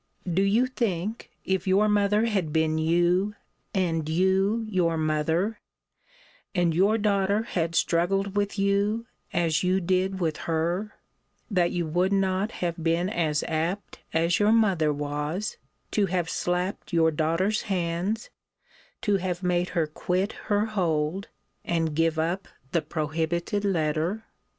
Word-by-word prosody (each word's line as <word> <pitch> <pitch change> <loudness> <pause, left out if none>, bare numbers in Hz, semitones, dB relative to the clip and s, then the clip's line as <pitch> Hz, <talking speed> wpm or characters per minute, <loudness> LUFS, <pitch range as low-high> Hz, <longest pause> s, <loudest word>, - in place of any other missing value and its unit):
Do 180 +2 +1
you 205 +6 +3
think, 220 -4 -2 0.2
if 190 0 -1
your 195 +3 +4
mother 210 +1 +3
had 195 -9 0
been 160 0 +1
you, 175 +5 +2 0.4
and 165 -5 0
you 190 +6 +2
your 175 -5 +1
mother, 160 +7 0 1.0
and 175 -2 +2
your 200 +6 +3
daughter 205 0 +1
had 170 -7 -2
struggled 195 +5 +1
with 205 0 0
you, 200 +3 +1 0.3
as 165 -2 +1
you 185 +1 +2
did 185 +1 0
with 160 -3 0
her, 170 +6 -1 0.6
that 180 -3 +3
you 175 -1 -1
would 175 +5 +1
not 195 +2 +1
have 170 -1 -3
been 170 +3 +1
as 155 -6 0
apt 165 +5 -2
as 165 +2 +2
your 210 +1 +4
mother 195 -9 +3
was 150 +7 -3 0.3
to 205 -2 +2
have 175 -2 -1
slapped 180 +3 -2
your 165 -2 +4
daughter's 165 +7 +1
hands, 185 +4 -1 0.7
to 205 -4 +3
have 180 -1 -3
made 180 0 +1
her 165 - +3
quit 180 +6 -1 0.2
her 205 0 +3
hold, 175 -3 -1 0.4
and 165 -3 -1
give 165 0 +2
up 175 +4 -1 0.2
the 170 - +2
prohibited 160 +5 -2
letter? 170 +3 0
180 Hz, 135 wpm, -26 LUFS, 165-200 Hz, 1.0 s, your